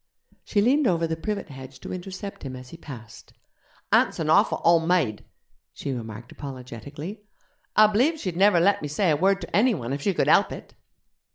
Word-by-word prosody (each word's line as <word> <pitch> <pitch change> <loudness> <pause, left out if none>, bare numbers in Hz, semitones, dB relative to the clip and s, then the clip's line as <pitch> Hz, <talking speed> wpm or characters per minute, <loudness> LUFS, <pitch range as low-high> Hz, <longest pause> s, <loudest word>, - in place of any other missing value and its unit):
She 205 -2 +1
leaned 270 +4 +3
over 170 -2 +2
the 160 0 -2
privet 200 +3 -4
hedge 130 -1 -10
to - - -6
intercept 185 +2 -7
him 130 -2 -6
as 125 0 -10
he - - -10
passed. 120 -8 -11 0.6
'Aunt's - - +3
an - - 0
awful - - +4
ole 170 -1 +5
maid,' 160 -12 +1 0.5
she 140 - -5
remarked 115 -1 -7
apologetically; 140 - -8 0.5
'I 215 - +8
b'lieve 280 +10 +3
she'd 185 - -4
never 195 -1 +5
let 200 +4 +3
me 150 - -3
say 160 +4 +1
a - - +3
word 195 +5 +2
to 170 - -5
enny 235 +2 +4
one 125 -4 -4
if 140 - -3
she 195 +4 0
could - - +2
help - - +4
it.' - - -9
165 Hz, 195 wpm, -25 LUFS, 135-200 Hz, 0.6 s, I